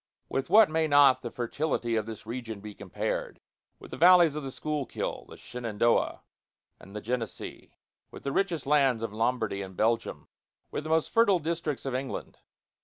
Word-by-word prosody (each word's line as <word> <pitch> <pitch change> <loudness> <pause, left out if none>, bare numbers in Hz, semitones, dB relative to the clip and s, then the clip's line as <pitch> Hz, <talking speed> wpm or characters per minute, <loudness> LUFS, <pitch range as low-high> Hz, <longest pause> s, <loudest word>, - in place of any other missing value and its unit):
With 135 - -2
what 215 +2 +7
may 160 0 0
not 145 -3 +6
the 120 - -5
fertility 120 0 -2
of 110 -1 -1
this 110 -1 -8
region 115 -2 -6
be 105 +1 -9
compared? 100 -2 -4 0.4
With - - -14
the - - -6
valleys 175 -3 +7
of 150 - -4
the 135 -2 -6
Schuylkill, 150 -1 -4
the - - -11
Shenandoah, 115 -1 -1 0.6
and 100 - -14
the 105 - -4
Genesee; 115 +1 -5 0.3
with - - -12
the 140 - -2
richest 170 -4 0
lands 135 -5 +3
of 115 - -4
Lombardy 110 -3 -1
and 95 -1 -8
Belgium; 115 +1 0 0.4
with 150 - -4
the - - -5
most 160 0 +1
fertile 225 -5 +4
districts 160 -3 -3
of 135 - -2
England. 130 +1 -5
130 Hz, 175 wpm, -28 LUFS, 115-155 Hz, 0.6 s, what